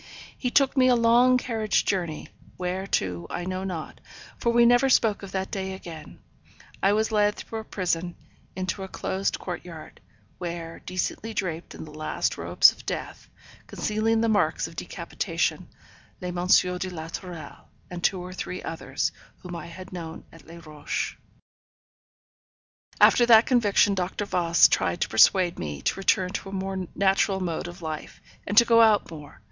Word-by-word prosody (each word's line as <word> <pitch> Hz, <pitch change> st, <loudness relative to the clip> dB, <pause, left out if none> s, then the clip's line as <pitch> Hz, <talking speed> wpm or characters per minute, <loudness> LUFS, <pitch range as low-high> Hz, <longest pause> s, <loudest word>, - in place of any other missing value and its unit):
He 250 Hz, -, -2 dB
took 275 Hz, +2 st, +3 dB
me 255 Hz, -2 st, +5 dB
a 250 Hz, -, +5 dB
long 240 Hz, +2 st, +5 dB
carriage 225 Hz, -4 st, 0 dB
journey, 175 Hz, -5 st, -2 dB, 0.3 s
where 185 Hz, +2 st, -3 dB
to 90 Hz, -, -1 dB
I 175 Hz, -, -4 dB
know 185 Hz, 0 st, -3 dB
not, 175 Hz, -5 st, -6 dB, 0.4 s
for 235 Hz, -, +1 dB
we 235 Hz, 0 st, +5 dB
never 245 Hz, +3 st, +5 dB
spoke 225 Hz, -5 st, +3 dB
of 195 Hz, -2 st, -9 dB
that 190 Hz, 0 st, -3 dB
day 190 Hz, -2 st, -3 dB
again; 170 Hz, -4 st, -10 dB, 0.6 s
I 195 Hz, +1 st, +4 dB
was 220 Hz, +1 st, +1 dB
led 210 Hz, -1 st, +2 dB
through 225 Hz, -, -6 dB
a -, -, -7 dB
prison, 175 Hz, -4 st, -2 dB, 0.4 s
into 185 Hz, +1 st, -3 dB
a 190 Hz, -, -5 dB
closed 190 Hz, +1 st, -2 dB
court 180 Hz, -2 st, -6 dB
yard, 165 Hz, -3 st, -11 dB, 0.4 s
where, 170 Hz, -2 st, -6 dB
decently 210 Hz, +4 st, -4 dB
draped 170 Hz, -4 st, -4 dB
in -, -, -8 dB
the 150 Hz, -, -12 dB
last 155 Hz, 0 st, -2 dB
robes -, -, +5 dB
of -, -, -15 dB
death, -, -, -6 dB, 0.4 s
concealing 225 Hz, +1 st, 0 dB
the 230 Hz, -, +2 dB
marks 215 Hz, -2 st, +1 dB
of -, -, -13 dB
decapitation, -, -, -3 dB, 0.5 s
lay 180 Hz, -, -5 dB
M. 175 Hz, 0 st, -3 dB
de 180 Hz, 0 st, +3 dB
la 160 Hz, -3 st, -7 dB
Tourelle, 175 Hz, -1 st, -9 dB, 0.2 s
and 175 Hz, -1 st, -6 dB
two 190 Hz, -, +2 dB
or 180 Hz, +1 st, -7 dB
three 185 Hz, 0 st, -5 dB
others, 165 Hz, -, -3 dB, 0.3 s
whom 180 Hz, -1 st, -7 dB
I 170 Hz, -, -7 dB
had 185 Hz, +2 st, -11 dB
known 165 Hz, -2 st, -7 dB
at 165 Hz, -3 st, -17 dB
Les 170 Hz, +1 st, -11 dB
Rochers. 150 Hz, -1 st, -4 dB, 1.8 s
After 240 Hz, -, +6 dB
that 225 Hz, -1 st, +7 dB
conviction 210 Hz, -5 st, +3 dB
Dr. 190 Hz, +2 st, -2 dB
Voss 170 Hz, -3 st, +4 dB
tried 85 Hz, -2 st, 0 dB
to -, -, 0 dB
persuade 175 Hz, -, +4 dB
me 75 Hz, -3 st, -5 dB
to -, -, +1 dB
return 185 Hz, -1 st, +2 dB
to 195 Hz, -, -5 dB
a -, -, -9 dB
more 190 Hz, -1 st, -3 dB
natural 195 Hz, 0 st, +2 dB
mode 175 Hz, -2 st, -3 dB
of 175 Hz, 0 st, -10 dB
life, 155 Hz, -1 st, -6 dB, 0.3 s
and 205 Hz, -, -3 dB
to 235 Hz, -, +9 dB
go 230 Hz, -1 st, +5 dB
out 215 Hz, -5 st, +4 dB
more. 150 Hz, -3 st, -11 dB
185 Hz, 175 wpm, -26 LUFS, 170-210 Hz, 1.8 s, to